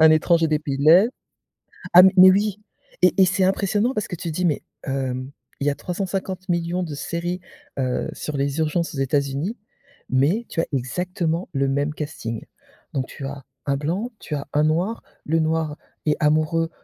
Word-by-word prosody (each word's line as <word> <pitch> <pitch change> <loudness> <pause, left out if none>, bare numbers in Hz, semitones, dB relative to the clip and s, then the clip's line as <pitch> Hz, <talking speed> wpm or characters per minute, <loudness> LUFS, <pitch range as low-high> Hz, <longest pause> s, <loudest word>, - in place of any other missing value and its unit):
un 160 0 +8
étranger 165 +1 +3
des 155 - +2
pays 140 -3 -3
de 140 - -1
l'est. 185 +7 +7 0.9
Ah, 175 - +10
m 190 - +8
mais 185 +1 +10
oui 205 +1 +1 0.4
et 180 - +5
et - - +8
c'est 185 +1 +1
impressionnant 200 +5 +1
parce 215 - -2
que - - -5
tu 170 -1 -4
dis: 180 +3 -1
«Mais 155 -4 +1 0.2
hem, 130 -1 -3 0.3
il 140 - -1
y - - +6
a 140 - -1
350 185 +3 -4
millions 175 0 0
de 155 -4 -5
séries, 175 +4 -3 0.4
heu, 130 -2 -1
sur 150 -2 -5
les 140 +2 -1
urgences 160 0 0
aux - - -6
États-Unis, 140 - -1 0.5
mais 155 - +2
tu 165 - -1
as - - -2
exactement 170 +6 -2
le 135 0 +1
même 145 +2 0
casting». 145 -7 -5 0.5
Donc 130 -1 -1
tu 140 - -8
as 140 0 -6 0.2
un 140 - +1
blanc, 180 - -2
tu 150 - -4
as 140 - -5
un 150 - +3
noir, 175 +9 0 0.2
le 165 +2 +1
noir 160 -1 0 0.3
est 150 -1 +3
amoureux 155 +2 +2
160 Hz, 190 wpm, -23 LUFS, 140-180 Hz, 0.9 s, Ah